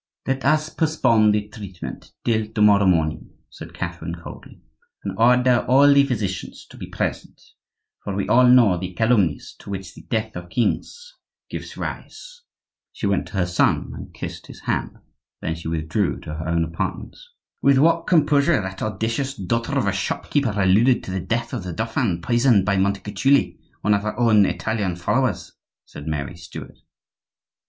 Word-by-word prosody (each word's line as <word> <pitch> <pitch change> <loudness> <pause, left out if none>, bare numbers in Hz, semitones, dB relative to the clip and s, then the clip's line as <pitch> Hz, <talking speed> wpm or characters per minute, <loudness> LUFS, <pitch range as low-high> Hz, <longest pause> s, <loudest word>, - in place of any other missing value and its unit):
"Let 135 0 -1
us 155 +2 +2
postpone 130 -11 +2
the 105 0 0
treatment 100 -4 -9
till 110 -2 +1
to 110 0 -3
morrow 100 -2 +5
morning," 80 -3 0
said - - -11
Catherine, 85 -1 -5
coldly, 85 - -12 0.4
"and 95 -1 -4
order 125 +2 +4
all 140 +3 +6
the 140 0 +6
physicians 105 -9 -4
to - - -13
be - - -7
present; - - -4 0.6
for 100 - -4
we 100 - -2
all 125 +1 +5
know 120 -8 +5
the 90 0 -6
calumnies 110 -8 +1
to - - -12
which 95 -2 -6
the - - -13
death 110 -1 -3
of 85 0 -7
kings 475 - -2 0.4
gives - - -7
rise." - - -7 0.5
She - - -5
went 100 -2 0
to - - -15
her 95 -3 +1
son 90 0 +1
and - - -9
kissed - - -8
his - - -12
hand; - - -2 0.4
then 80 - -2
she 80 0 -8
withdrew 80 +4 -1
to 75 - -7
her 80 +1 -5
own 85 0 +1
apartments. 80 - -5 0.4
"With 140 -1 +4
what 165 +4 +3
composure 155 -3 +3
that 95 -1 -6
audacious 115 +6 -2
daughter 115 +6 -2
of 130 - +1
a 100 - +2
shop 100 - -3
keeper 125 -9 +1
alluded 105 +7 +4
to - - -6
the 95 - -2
death 115 +4 -2
of - - -2
the 90 -1 -5
dauphin, 110 -5 -1
poisoned 120 -5 +3
by 100 -1 +1
Montecuculi, 105 +8 +1 0.2
one 105 - +2
of 100 - +2
her 105 +2 -4
own 110 -4 +5
Italian 105 -5 -2
followers!" 90 -1 -1 0.3
said 75 - -10
Mary 75 +1 -3
Stuart. 85 -1 -10
105 Hz, 170 wpm, -22 LUFS, 90-125 Hz, 0.6 s, all